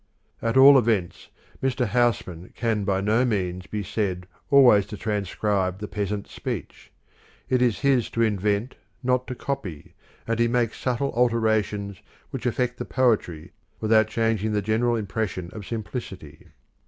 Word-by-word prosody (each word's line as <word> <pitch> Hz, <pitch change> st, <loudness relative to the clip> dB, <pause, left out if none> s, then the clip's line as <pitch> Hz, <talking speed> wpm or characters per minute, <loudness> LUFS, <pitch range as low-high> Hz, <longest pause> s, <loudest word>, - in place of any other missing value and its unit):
At 115 Hz, +2 st, 0 dB
all 135 Hz, +1 st, +9 dB
events 105 Hz, -7 st, -1 dB, 0.3 s
Mr. 130 Hz, -1 st, 0 dB
Housman 105 Hz, -7 st, -1 dB
can 110 Hz, -4 st, -1 dB
by 95 Hz, -1 st, +1 dB
no 110 Hz, +5 st, +2 dB
means 95 Hz, -6 st, -2 dB
be 105 Hz, -1 st, -4 dB
said 95 Hz, -3 st, -2 dB, 0.2 s
always 125 Hz, -8 st, +6 dB
to 105 Hz, -, -7 dB
transcribe 100 Hz, -2 st, -1 dB
the 105 Hz, +1 st, -6 dB
peasant 105 Hz, 0 st, -3 dB
speech. -, -, -7 dB, 0.6 s
It 130 Hz, -1 st, +2 dB
is 120 Hz, -4 st, +1 dB
his 135 Hz, -5 st, +2 dB
to 115 Hz, -, +4 dB
invent, 105 Hz, +2 st, 0 dB, 0.3 s
not 125 Hz, 0 st, +1 dB
to 125 Hz, -, -5 dB
copy, 115 Hz, -, -5 dB, 0.3 s
and 115 Hz, 0 st, -1 dB
he 120 Hz, -, +4 dB
makes 120 Hz, -2 st, 0 dB
subtle 130 Hz, +2 st, -1 dB
alterations 110 Hz, -4 st, 0 dB, 0.3 s
which -, -, -3 dB
affect 125 Hz, 0 st, -1 dB
the -, -, -2 dB
poetry 105 Hz, -11 st, 0 dB, 0.3 s
without 110 Hz, 0 st, +3 dB
changing 110 Hz, -1 st, 0 dB
the 105 Hz, -1 st, 0 dB
general 115 Hz, +3 st, +1 dB
impression 100 Hz, -4 st, -3 dB
of 105 Hz, -3 st, -8 dB
simplicity. 100 Hz, -, -7 dB
110 Hz, 145 wpm, -24 LUFS, 100-120 Hz, 0.6 s, all